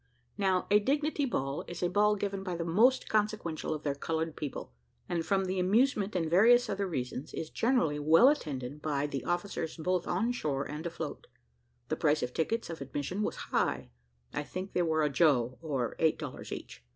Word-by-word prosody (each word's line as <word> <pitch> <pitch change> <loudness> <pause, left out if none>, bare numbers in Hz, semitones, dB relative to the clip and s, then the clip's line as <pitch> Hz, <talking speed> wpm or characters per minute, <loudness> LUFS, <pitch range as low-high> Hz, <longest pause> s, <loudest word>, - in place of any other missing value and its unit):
Now, 190 -3 +1
a 210 - +7
dignity 290 +5 0
ball 135 - -2
is 175 0 -6
a - - +3
ball 210 +3 +3
given 200 -1 -3
by 185 -2 -3
the 170 0 -3
most 230 +10 +3
consequential 210 -8 -1
of 155 -1 -3
their 145 - 0
coloured 160 +2 -2
people, 140 - -6 0.3
and 170 -2 -1
from 190 +3 +1
the 185 0 -1
amusement 210 +1 +2
and 165 -3 +1
various 230 +9 +5
other 200 0 -1
reasons, 130 -3 -4
is 160 - -5
generally 200 - +1
well 160 - +6
attended 145 - -1
by 145 -2 0
the 140 -2 -3
officers 175 -2 -2
both 180 +2 -1
on 200 +7 +1
shore 145 - -1
and 150 +3 -5
afloat. 160 -3 -6 0.6
The - - -1
price 150 -1 +2
of 125 - -1
the - - -23
tickets 220 +4 -1
of 160 - -7
admission 145 +8 -3
was - - -1 0.2
high 65 -2 0 0.4
I - - -1
think 185 +6 -6
they 180 - +2
were 160 -2 +2
a 150 - +2
joe, 130 -5 +2
or 135 -7 -2
eight 160 -1 +3
dollars 145 -5 -7
each. - - -8
170 Hz, 195 wpm, -31 LUFS, 150-200 Hz, 0.6 s, a